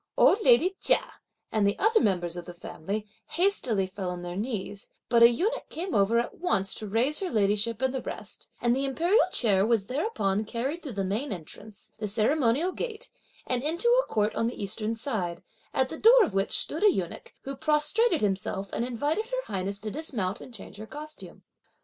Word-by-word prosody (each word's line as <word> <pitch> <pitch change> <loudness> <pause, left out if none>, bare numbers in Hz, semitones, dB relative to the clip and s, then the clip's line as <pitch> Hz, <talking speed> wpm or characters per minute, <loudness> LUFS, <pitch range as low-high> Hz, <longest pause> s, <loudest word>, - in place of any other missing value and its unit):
Old 425 - +5
lady 390 -6 +5
Chia - - +2 0.4
and 210 -2 +2
the 200 - 0
other 440 +2 +4
members 175 -5 +1
of 175 -1 -6
the 175 - -9
family 195 +4 -5 0.3
hastily 305 - +1
fell 185 0 -5
on 180 0 -5
their 175 0 -5
knees, 205 -2 -4 0.2
but 235 -1 +4
a 235 - +10
eunuch 405 - -1
came 355 +3 -4
over 205 +3 +3
at 235 - -2
once 195 - +1
to 215 - -5
raise 240 +9 +1
her 380 - -2
ladyship 210 +1 +1
and 260 0 +2
the 265 - -2
rest; - - -7
and 240 0 +2
the 270 - -1
imperial 340 - +3
chair 200 -5 +3
was 220 -2 +2
thereupon 215 - -1
carried 260 +10 -3
through 280 -7 -7
the 195 -1 -2
main 215 +10 -2
entrance, 200 +4 -9
the 210 - -2
ceremonial 245 - +2
gate 470 +3 -5 0.3
and 250 -1 0
into 335 - +1
a - - -14
court 210 0 +1
on 230 - 0
the 240 - -5
eastern 215 +3 -3
side, 210 -9 -3 0.3
at 260 -1 +1
the 320 - -7
door 470 +2 +7
of 285 - -2
which 195 +1 0
stood 320 - -1
a 420 - +7
eunuch, 180 - -4
who 275 +1 -5
prostrated 310 - +2
himself 195 -1 -2
and - - -1
invited 290 - -1
(her - - -3
highness) 195 0 -3
to 215 +1 -5
dismount 225 - -3
and - - -10
change 215 -3 -10
her 215 +1 -8
costume. 305 +3 -9
235 Hz, 200 wpm, -27 LUFS, 200-310 Hz, 0.4 s, a